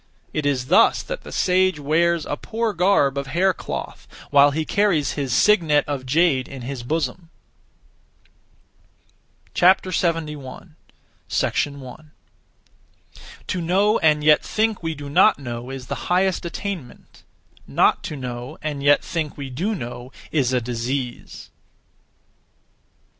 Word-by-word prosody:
It 150 -2 -1
is 130 -3 0
thus - - +4
that - - -6
the - - -11
sage 185 -3 +2
wears 165 +3 +1
(a - - -2
poor 225 +6 -3
garb 165 -7 +2
of) 140 - -5
hair 180 +7 +2
cloth, - - -7 0.2
while 145 0 +6
he 155 +2 -2
carries 195 -8 +1
his 140 -3 -3
(signet 160 - +3
of) 135 -3 -4
jade 145 -3 +2
in 135 -3 -9
his 130 0 -5
bosom. 160 +5 -3 2.2
71. 165 -5 0 0.5
1. 140 +2 -2 1.3
To 185 - -3
know 195 +6 +2
and 150 -1 +3
yet 150 0 +5
(think) 220 -1 -1
we 165 -1 -3
do 145 0 -8
not 185 +8 +4
know 120 -2 -6
is 135 -2 -7
the - - -6
highest 185 0 +1
(attainment); 170 -6 -7 0.5
not - - +2
to 150 - -5
know 125 -2 -6
(and 150 -2 -3
yet 145 +1 +4
think) 160 -4 -4
we 140 -2 -6
do 195 - -2
know 120 -4 -7 0.2
is 135 -5 +1
a 130 - +2
disease. 120 +2 -5
150 Hz, 130 wpm, -22 LUFS, 135-180 Hz, 2.2 s, while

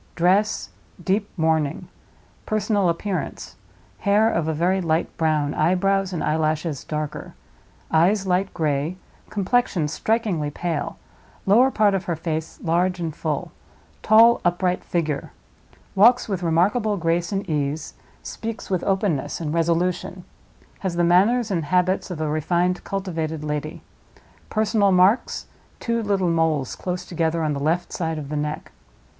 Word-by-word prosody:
Dress—deep 195 +1 0
mourning. 160 -3 0 0.6
Personal 210 -3 +1
appearance—hair 205 +3 -2
of 165 -2 -1
a - - +1
very 180 +5 +1
light 165 -1 -1
brown; 155 -3 +1
eyebrows 190 +4 +1
and 175 - -3
eyelashes 155 -1 -1
darker; 150 -1 -5 0.6
eyes 190 +5 +3
light 190 +1 +1
gray; 155 +1 -1 0.3
complexion 200 -5 +1
strikingly 190 -2 -1
pale; 165 0 -3 0.5
lower 235 +7 +5
part 210 -5 +3
of 190 -2 -1
her 170 - -1
face 160 0 -4
large 180 +2 +1
and 165 -3 -3
full; 150 -3 -3 0.5
tall 230 +2 +6
upright 180 +1 0
figure; 155 -5 -2 0.6
walks 235 +6 +5
with 195 -4 -2
remarkable 200 +6 +1
grace 170 0 0
and 195 -1 -2
ease; 150 -1 -2 0.3
speaks 225 -2 -6
with 185 -2 0
openness 190 -7 0
and 155 -2 -3
resolution; 170 +2 0 0.6
has 185 -3 -3
the 175 - +2
manners 205 +7 +3
and 170 -5 -1
habits 185 +4 +1
of 175 -4 -5
a 155 - -1
refined, 175 +4 0
cultivated 165 -6 -3
lady. 150 0 -4 0.7
Personal 215 -2 +2
marks—two 215 +4 0
little 195 -4 +1
moles, 160 -5 0
close 180 -1 -4
together, 165 -1 -1
on 150 -1 0
the 140 - -3
left 165 +5 -1
side 160 -2 -2
of 145 -2 -6
the 150 - -3
neck. 150 +1 -3
175 Hz, 130 wpm, -23 LUFS, 160-195 Hz, 0.7 s, tall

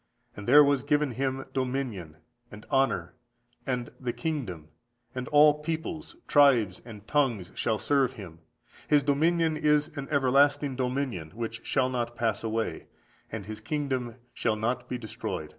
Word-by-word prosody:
And 105 - -8
there 145 +4 +8
was 140 -2 +2
given 145 0 +1
Him 135 +2 -2
dominion, 125 - -3 0.4
and 105 +1 -11
honour, 90 -11 +1 0.5
and 125 -2 -2
the 125 -2 -2
kingdom; 115 - -4 0.4
and 125 0 -4
all 150 0 +6
peoples, 160 - -4
tribes, 125 -10 +4
and 110 -3 -11
tongues 120 -11 0
shall 110 -2 0
serve 135 +3 +1
Him: 90 -9 -10 0.5
His 145 -1 +4
dominion 160 +3 +2
is 150 0 +2
an 140 -2 -5
everlasting 140 0 +3
dominion, 125 - -2
which 115 0 -5
shall 130 -1 +1
not 120 -1 -2
pass 110 -3 -1
away, 110 -6 -2 0.4
and 110 -3 -5
His 105 +1 -7
kingdom 130 -1 -2 0.2
shall 110 - 0
not 120 +3 -2
be 125 - -2
destroyed." 110 -3 -5
130 Hz, 145 wpm, -28 LUFS, 110-145 Hz, 0.5 s, there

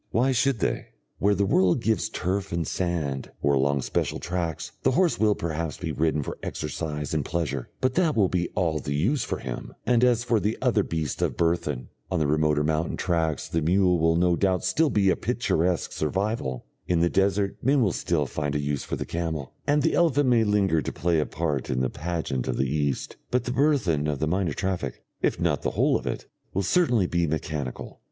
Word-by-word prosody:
Why 125 +4 +2
should 130 -2 +1
they? - - -1 0.3
Where 100 +1 +3
the 100 +1 +1
world 95 +1 +3
gives 110 -1 0
turf 100 -1 -2
or 85 -1 0
sand, 80 -6 -2
or 70 - +2
along 70 0 +2
special - - -1
tracts, 85 -3 -3
the - - +2
horse 175 +3 +2
will 105 -1 +3
perhaps 80 -2 -3
be - - -4
ridden 75 -1 0
for - - -6
exercise 75 0 -4
and 75 -2 +1
pleasure, 75 -6 -2
but 130 0 +2
that 170 -2 +2
will 100 -4 +4
be 90 -1 -1
all 80 -4 +1
the 70 -1 -3
use 115 - +1
for - - -3
him; 60 -2 -6
and 120 0 +3
as 120 -2 +4
for 115 -2 +2
the 105 +2 -1
other 125 -5 +2
beasts 80 -6 -3
of - - 0
burthen, 80 -6 0 0.2
on - - 0
the 80 - +1
remoter 75 0 +2
mountain 80 +2 0
tracks 80 -5 0
the 80 - -1
mule 90 +2 +3
will 80 +1 +3
no 90 +1 +3
doubt 95 0 +1
still 155 +12 +2
be 100 -6 +3
a - - +2
picturesque 85 +1 0
survival, 80 - -2 0.2
in 85 -2 +2
the 85 - +4
desert 100 +2 +1
men 135 0 +3
will 100 - +2
still 80 -4 0
find 75 +2 -3
a - - +1
use 70 -1 -2
for - - -3
the - - -4
camel, 80 -5 -3
and 145 0 +3
the 165 - +2
elephant 145 -5 +3
may 120 -2 +4
linger 100 -6 +2
to - - -3
play 85 -1 +1
a 75 - 0
part 75 -5 -2
in 65 - 0
the 65 0 0
pageant 80 -6 -3
of - - -1
the 65 - +2
East. 70 -1 -1
But 125 -1 +1
the 125 - -3
burthen 120 - +2
of 75 -2 -1
the 80 - 0
minor 90 -1 0
traffic, 95 +1 -3 0.2
if - - +1
not - - +1
the - - 0
whole - - +2
of - - -2
it, - - -3 0.3
will 100 - +1
certainly 120 - +3
be 85 -1 0
mechanical. 75 -4 -4
85 Hz, 215 wpm, -26 LUFS, 75-105 Hz, 0.3 s, will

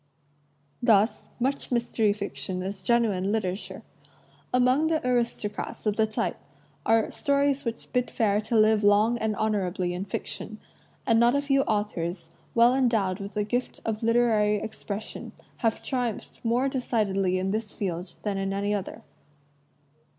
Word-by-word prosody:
Thus, 220 -2 +3
much 270 +3 -1
mystery 235 -3 +2
fiction 200 -2 -4
is 190 0 -4
genuine 205 -3 +2
literature. 200 -3 -3 0.7
Among 255 +5 +3
the 315 -4 0
aristocrats 235 -5 -2
of 210 -1 +1
the 220 0 +2
type 215 - -2 0.5
are 225 -1 +3
stories 280 -1 +1
which 230 -1 -5
bid 250 -1 +1
fair 210 -2 +1
to 220 +2 -2
live 215 0 +4
long 210 +4 +4
and 220 -1 0
honorably 190 -4 -1
in 180 +2 -4
fiction, - - -5 0.5
and 225 -2 +4
not 240 +2 +5
a 280 - +2
few 275 -1 +3
authors, 175 -5 -2 0.2
well 235 +1 +6
endowed 225 -8 +1
with 200 +1 -7
the 210 - +1
gift 245 +4 -2
of 220 -1 -2
literary 225 -2 +3
expression, 210 0 -6 0.2
have 225 -3 0
triumphed 245 -4 -3
more 240 +3 +2
decidedly 200 -8 0
in 190 +1 -1
this 215 0 -2
field 180 -2 -4
than 200 -2 -1
in 195 0 -1
any 200 +1 0
other. 200 -3 -4
215 Hz, 145 wpm, -27 LUFS, 200-240 Hz, 0.7 s, well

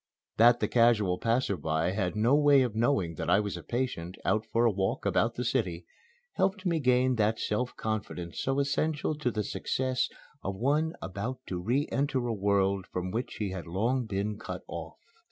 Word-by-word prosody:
That 120 +1 +6
the - - +2
casual 110 -6 +3
passer 115 -2 +1
by 80 +1 0
had 95 -3 -1
no 115 +5 +3
way 145 -2 +6
of 120 -4 -2
knowing 110 -7 +1
that - - -3
I 100 - +5
was 105 -1 -2
a - - -6
patient, 120 -8 -3
out 110 0 +1
for 115 +2 +2
a 115 - +5
walk 95 -1 -1
about 115 +1 +2
the 125 - -3
city, 90 -9 -1 0.5
helped 195 +1 0
me 170 -3 +1
gain 125 -2 +3
that 110 +1 +2
self 125 +4 -1
confidence 100 -6 -4
so 135 +1 0
essential 145 +2 0
to 150 -4 -1
the 105 -2 -2
success 130 +4 -1 0.3
of 95 - -3
one 150 +9 +1
about 115 +7 -4
to 90 - -2
re 125 +9 +1
enter 135 -3 0
a 120 - 0
world 100 -2 +1
from 90 0 -3
which 120 +5 -3
he 100 -2 -3
had 95 -2 -6
long 115 +8 0
been 105 +1 -2
cut 90 -4 -6
off. 85 -1 -7
110 Hz, 190 wpm, -29 LUFS, 95-130 Hz, 0.5 s, That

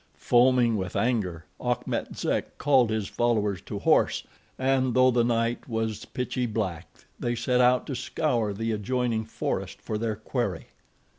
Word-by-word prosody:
Foaming 120 -2 +4
with 95 -2 -4
anger, 95 -10 0 0.2
Achmet 125 0 -2
Zek - - -2
called 130 -5 +4
his 110 -3 -1
followers 105 -6 0
to - - -6
horse, - - +2 0.3
and 130 -1 +1
though 130 0 +6
the 120 -1 +3
night 115 +1 0
was 110 -2 -2
pitchy 125 0 -2
black 95 -7 -3 0.3
they 120 0 -1
set 125 +2 +1
out 125 0 +4
to 140 - -4
scour 125 -3 -1
the 115 +3 -2
adjoining 115 +1 -1
forest 110 - -3
for 105 - -4
their 110 -1 -1
quarry. 110 -4 -3
115 Hz, 150 wpm, -27 LUFS, 110-125 Hz, 0.3 s, though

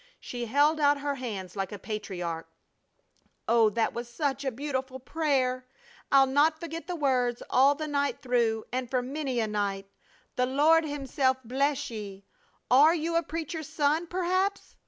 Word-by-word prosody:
She 240 -1 -5
held 290 +6 +3
out 285 -1 +3
her 285 0 -1
hands 210 -9 -6
like 195 -1 -3
a 205 - -5
patriarch: 180 -6 -5 1.0
"Oh, 230 -1 +5
that 225 +2 0
was 235 0 -5
such 275 +2 -2
a 270 - 0
beautiful 260 0 -4
prayer! 260 -3 0 0.4
I'll 275 -1 +7
not 295 +4 +2
forget 330 -1 -6
the 360 - -3
words 255 -5 0
all 275 +3 +5
the 310 +1 -4
night 285 -1 -1
through 235 -3 +1
and 255 -1 -2
for 255 -1 0
many 270 -1 -3
a 225 - +1
night. 200 -2 -2 0.5
The 250 0 +2
Lord 310 +5 +4
Himself 275 -2 0
bless 275 +2 0
ye! 200 -3 -8 0.5
Are 295 +6 +7
you 330 +1 -2
a 335 - +4
preacher's 320 -2 -5
son, 305 +3 +1
perhaps?" 370 +3 -1
265 Hz, 160 wpm, -28 LUFS, 235-300 Hz, 1.0 s, I'll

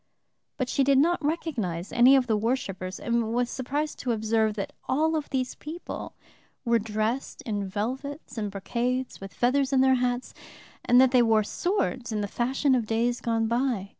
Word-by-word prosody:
But 255 - -1
she 275 - +1
did 275 0 +4
not 330 +3 +3
recognize 235 - -2
any 250 +3 +6
of 265 -2 +3
the 225 -3 +1
worshipers 200 -5 -2
and 235 -1 0
was 245 0 0
surprised 290 +4 -3
to 245 - -1
observe 220 -1 +1
that 200 - -4 0.2
all 315 +5 +2
of 305 -2 -3
these 255 -2 -1
people 320 +4 -7 0.5
were 235 -1 +3
dressed 220 +4 -2
in 205 -3 -2
velvets 260 - -4
and 210 -3 -2
brocades, 240 +6 -2
with 195 0 -8
feathers 265 +3 +1
in 265 -1 +4
their 265 0 +5
hats, 245 0 -1 0.5
and 245 +1 +5
that 260 -1 +6
they 250 -2 +5
wore 220 -2 +4
swords 260 - -1
in 215 -1 -1
the 205 - -2
fashion 260 +6 +1
of 240 -4 +1
days 235 +2 0
gone 225 -1 0
by. 235 -4 0
245 Hz, 180 wpm, -27 LUFS, 220-265 Hz, 0.5 s, any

